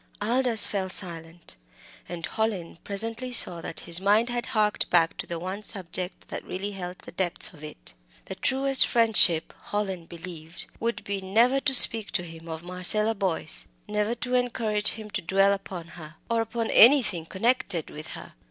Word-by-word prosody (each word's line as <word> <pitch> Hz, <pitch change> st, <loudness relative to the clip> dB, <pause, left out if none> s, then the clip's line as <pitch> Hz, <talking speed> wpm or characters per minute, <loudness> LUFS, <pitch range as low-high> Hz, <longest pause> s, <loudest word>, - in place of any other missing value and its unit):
Aldous 235 Hz, +1 st, +2 dB
fell 190 Hz, -2 st, -3 dB
silent, 170 Hz, -3 st, -5 dB, 0.5 s
and 170 Hz, -1 st, -5 dB
Hallin 200 Hz, -7 st, -4 dB
presently 225 Hz, +5 st, -3 dB
saw 180 Hz, -8 st, +4 dB
that 165 Hz, -, -6 dB
his 170 Hz, +1 st, 0 dB
mind 210 Hz, +4 st, +2 dB
had 240 Hz, -1 st, -3 dB
harked 210 Hz, -2 st, 0 dB
back 165 Hz, -2 st, +2 dB
to -, -, -6 dB
the 170 Hz, -, -5 dB
one 185 Hz, +4 st, -6 dB
subject 185 Hz, -3 st, -4 dB
that -, -, -6 dB
really 195 Hz, +3 st, -5 dB
held 180 Hz, -2 st, -7 dB
the -, -, -13 dB
depths 185 Hz, +3 st, -2 dB
of 155 Hz, -2 st, -16 dB
it. 150 Hz, -, -8 dB, 0.3 s
The -, -, -7 dB
truest 270 Hz, 0 st, +2 dB
friendship, 205 Hz, -8 st, +4 dB
Hallin 190 Hz, -5 st, -4 dB
believed, 170 Hz, -1 st, -9 dB
would 235 Hz, +1 st, -3 dB
be 200 Hz, -1 st, -4 dB
never 230 Hz, +8 st, +2 dB
to 270 Hz, -1 st, +3 dB
speak 225 Hz, -3 st, +9 dB
to 175 Hz, -, 0 dB
him 165 Hz, -1 st, -11 dB
of 160 Hz, 0 st, -7 dB
Marcella 185 Hz, +5 st, +2 dB
Boyce 190 Hz, -7 st, 0 dB, 0.2 s
never 210 Hz, +2 st, -2 dB
to 250 Hz, +1 st, -5 dB
encourage 230 Hz, -4 st, 0 dB
him 215 Hz, -1 st, -10 dB
to 195 Hz, -, -3 dB
dwell 195 Hz, +3 st, +2 dB
upon 185 Hz, -4 st, -7 dB
her, 160 Hz, -2 st, -10 dB, 0.2 s
or 230 Hz, 0 st, +1 dB
upon 225 Hz, 0 st, -4 dB
anything 215 Hz, -, +5 dB
connected 200 Hz, -5 st, -1 dB
with 155 Hz, +1 st, -10 dB
her. -, -, -12 dB
195 Hz, 170 wpm, -25 LUFS, 175-225 Hz, 0.5 s, speak